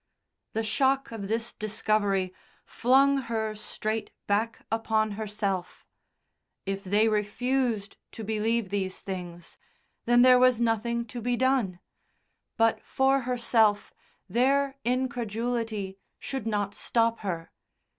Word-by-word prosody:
The 225 - -1
shock 270 +5 +1
of 210 -3 -5
this 225 +2 -2
discovery 205 -3 0 0.3
flung 275 +3 +4
her 220 -1 -1
straight 215 +1 -4 0.2
back 220 +3 -1
upon 220 -1 +1
herself; 200 -3 -3 0.8
if 195 0 -3
they 205 +3 +3
refused 220 +1 0 0.2
to 225 - -7
believe 220 0 0
these 190 -2 -2
things, 175 -3 -7 0.5
then 240 +1 +5
there 255 -1 +7
was 255 -2 +5
nothing 235 0 0
to 240 +2 -7
be 245 +1 0
done. 255 -8 +1 0.8
But 225 -1 +3
for 270 +3 +2
herself 225 -4 +2 0.3
their 270 +6 +2
incredulity 230 -4 -2 0.2
should 265 -5 -5
not 205 -2 -1
stop 230 -1 +1
her. 170 -5 -4
225 Hz, 115 wpm, -28 LUFS, 205-240 Hz, 0.8 s, there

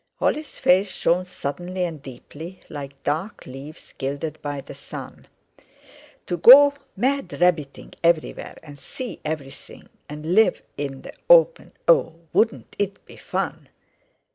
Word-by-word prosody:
Holly's 305 0 -1
face 190 +2 +3
shone 180 +1 +1
suddenly 180 +2 -4
and 165 -5 -4
deeply, 145 +7 -10
like 140 -2 -8
dark 160 +9 -3
leaves 135 +4 -11
gilded 145 +3 -4
by 145 -1 -4
the 135 - -10
sun. - - -10 1.0
"To 175 - -2
go 280 - +9 0.2
mad 270 +6 -1
rabbiting 165 -6 0
everywhere 170 -2 0
and 145 -2 -12
see 250 - -7
everything, 150 -3 -7 0.2
and 150 +3 -4
live 215 -2 +4
in 140 -2 -5
the - - -9 0.2
open—oh! - - +4 0.2
wouldn't 225 0 +1
it 200 -1 -3
be - - -14
fun?" - - -4
165 Hz, 125 wpm, -23 LUFS, 145-200 Hz, 1.0 s, go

